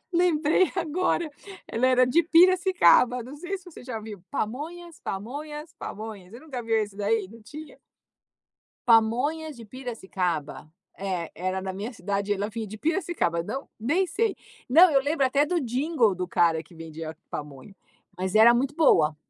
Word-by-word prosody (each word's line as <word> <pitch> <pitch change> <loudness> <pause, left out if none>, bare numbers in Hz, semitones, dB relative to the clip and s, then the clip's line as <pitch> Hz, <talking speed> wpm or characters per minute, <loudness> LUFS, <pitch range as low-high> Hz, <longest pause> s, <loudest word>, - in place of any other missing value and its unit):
lembrei 340 0 +3
agora, 340 -1 0 0.4
ela 240 +3 +1
era 255 0 +5
de 330 +7 +3
Piracicaba, 345 - +5
não 260 +5 -10
sei 360 +6 -4
se 370 - -21
você 355 -7 -12
já 230 -4 -5
viu: 210 -3 -9
"Pamonhas, 310 +8 -5
pamonhas, 295 - -6
pamonhas." 210 -4 -8
Você 235 - -10
nunca 270 -6 -6
viu 225 0 +1
esse 210 -2 -2
daí? 205 -1 0
Não 230 +2 -14
tinha? 300 +7 -11 1.1
"Pamonhas 250 +7 +2
de 230 - -10
Piracicaba." 190 - -4 0.3
É, 185 -4 -3
era 185 +2 -2
na 190 0 -4
minha 205 +6 -5
cidade, 200 0 -2
ela 205 +1 -2
vinha 220 0 -5
de 215 - -9
Piracicaba, 310 - 0
não 265 +10 -6
nem 330 - +1
sei. 425 +2 0 0.3
Não, 330 +7 +7
eu 275 - +5
lembro 285 0 +1
até 280 +3 +2
do 340 +2 0
jingle 250 - +1
do 180 0 -4
cara 165 -3 +2
que 170 +2 -19
vendia 160 -1 -8
pamonha. 145 +5 -8 0.4
Mas 185 +1 -3
era 230 +2 +8
muito 270 +4 -1
boa. 155 - +4
240 Hz, 160 wpm, -26 LUFS, 195-310 Hz, 1.1 s, era